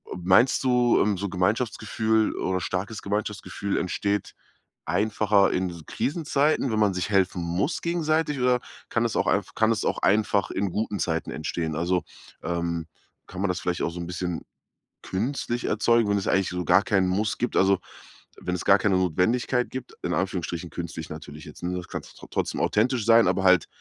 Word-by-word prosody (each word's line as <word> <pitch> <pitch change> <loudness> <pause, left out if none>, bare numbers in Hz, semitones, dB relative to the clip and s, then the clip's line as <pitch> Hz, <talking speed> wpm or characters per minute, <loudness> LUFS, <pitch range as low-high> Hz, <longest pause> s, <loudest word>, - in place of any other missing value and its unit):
meinst 95 +8 +3
du, 125 -2 +3
ähm, 105 -1 +1
so 100 +2 -2
Gemeinschaftsgefühl 110 +3 0
oder 95 0 -1
starkes 100 +5 -3
Gemeinschaftsgefühl 100 -1 -3
entsteht 100 +2 -1 0.5
einfacher 105 -1 +2
in 90 0 0
s 85 -3 -10
Krisenzeiten, 145 -3 0
wenn 110 - 0
man 105 -2 +3
sich 90 +2 -2
helfen 95 -2 +2
muss 90 - -1
gegenseitig, 160 -3 0
oder 125 0 +3 0.3
kann 115 0 +1
es 115 - -2
auch - - +1
einf 100 -1 0
kann 110 0 +2
es 110 -1 -1
auch - - 0
einfach 105 -1 +2
in 100 -1 -1
guten 105 +1 -2
Zeiten 80 -1 -1
entstehen? 80 0 -3
Also, 90 +3 0 0.4
ähm, 85 -1 -2 0.4
kann 95 0 -7
man 100 - +1
das 90 -1 -1
vielleicht 90 0 -2
auch - - 0
so 85 - -7
'n 85 - -5
bisschen 90 -1 -3 0.6
künstlich 120 +4 -2
erzeugen, 115 -2 +2
wenn 100 - +2
es 100 - -3
eigentlich 95 -1 +2
so 90 -1 -3
gar 90 +3 +5
keinen 95 -2 +2
Muss 105 +4 0
gibt 120 - -2
also, 95 0 +4 0.6
wenn 90 - -2
es 90 - -5
gar 100 - +7
keine 100 -2 +2
Notwendigkeit 115 +8 +1
gibt? 130 -1 -7
In 90 - -1
Anführungsstrichen 90 -2 -2
künstlich 80 -2 -6
natürlich 75 -1 -9
jetzt, - - -12
ne, 90 +1 -2
das 90 - -7
kann's - - -7 0.2
trotzdem - - -2
authentisch 115 +1 +1
sein, 115 -2 +6
aber 95 +1 0
halt 90 -2 +5
100 Hz, 180 wpm, -25 LUFS, 90-115 Hz, 0.6 s, gar